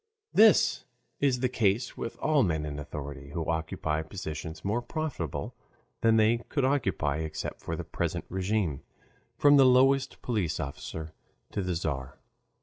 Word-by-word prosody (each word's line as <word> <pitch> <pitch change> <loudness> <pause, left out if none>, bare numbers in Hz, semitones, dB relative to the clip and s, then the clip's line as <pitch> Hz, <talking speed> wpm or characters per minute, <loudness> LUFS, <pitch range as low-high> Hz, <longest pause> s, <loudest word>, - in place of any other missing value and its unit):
This 220 0 +5 0.3
is 130 -3 +2
the 130 - +3
case 115 -1 +1
with 115 - -5
all 155 -2 +3
men 80 -8 0
in 75 -1 -5
authority, 70 -1 -7
who 80 -1 -2
occupy 80 -1 -1
positions 80 -1 -6
more 110 +5 +1
profitable 125 - -4 0.5
than 115 0 +4
they 110 +2 +4
could 140 -4 +1
occupy 95 - +1
except 80 0 -4
for - - -3
the - - -5
present - - -3
RÉGIME, 95 -5 0 0.6
from 145 0 +6
the 135 - +8
lowest 135 +1 +4
police 100 -9 -1
officer 80 +2 -6 0.4
to 100 - -2
the 90 -2 -1
Tzar. 70 -6 -3
95 Hz, 145 wpm, -29 LUFS, 80-125 Hz, 0.6 s, the